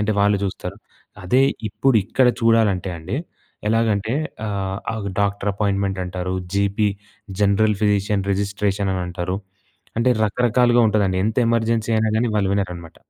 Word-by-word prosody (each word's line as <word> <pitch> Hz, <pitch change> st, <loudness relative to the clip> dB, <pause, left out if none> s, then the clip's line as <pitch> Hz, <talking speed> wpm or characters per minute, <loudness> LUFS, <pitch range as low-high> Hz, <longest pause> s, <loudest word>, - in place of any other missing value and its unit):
అంటే, 105 Hz, +1 st, 0 dB
వాళ్ళు 100 Hz, 0 st, +3 dB
జూస్తరు. 95 Hz, 0 st, -5 dB, 0.5 s
అదే 125 Hz, +9 st, +4 dB, 0.2 s
ఇప్పుడిక్కడ 125 Hz, 0 st, +2 dB
చూడాలంటే 110 Hz, -5 st, +3 dB
అండి, 90 Hz, +9 st, -4 dB, 0.5 s
ఎలాగంటే, 110 Hz, 0 st, +1 dB, 0.3 s
ఆహ్, 95 Hz, -2 st, -3 dB
అవు 105 Hz, -3 st, -4 dB
డాక్టరపాయిన్మెన్ట్ 100 Hz, -1 st, 0 dB
అంటారు. 90 Hz, 0 st, -4 dB, 0.2 s
జీపీ 100 Hz, +1 st, +1 dB, 0.5 s
జనరల్ 105 Hz, +1 st, +3 dB
ఫిజీషియన్ 105 Hz, -1 st, +1 dB
రిజిస్ట్రేషన్ 100 Hz, 0 st, -1 dB
అనంటారు. 90 Hz, 0 st, -3 dB, 0.6 s
అంటే, 120 Hz, +2 st, +3 dB
రకరకాలుగా 120 Hz, +2 st, +3 dB
ఉంటదండి. 100 Hz, -3 st, +1 dB
ఎంత 110 Hz, -, -2 dB
ఎమర్జెన్సీ 115 Hz, -1 st, +1 dB
అయినా 110 Hz, 0 st, +1 dB
గాని, 120 Hz, +2 st, +1 dB
వాళ్ళు 100 Hz, -2 st, +1 dB
వినరనమాట. 90 Hz, -4 st, -4 dB
100 Hz, 120 wpm, -21 LUFS, 95-110 Hz, 0.6 s, అదే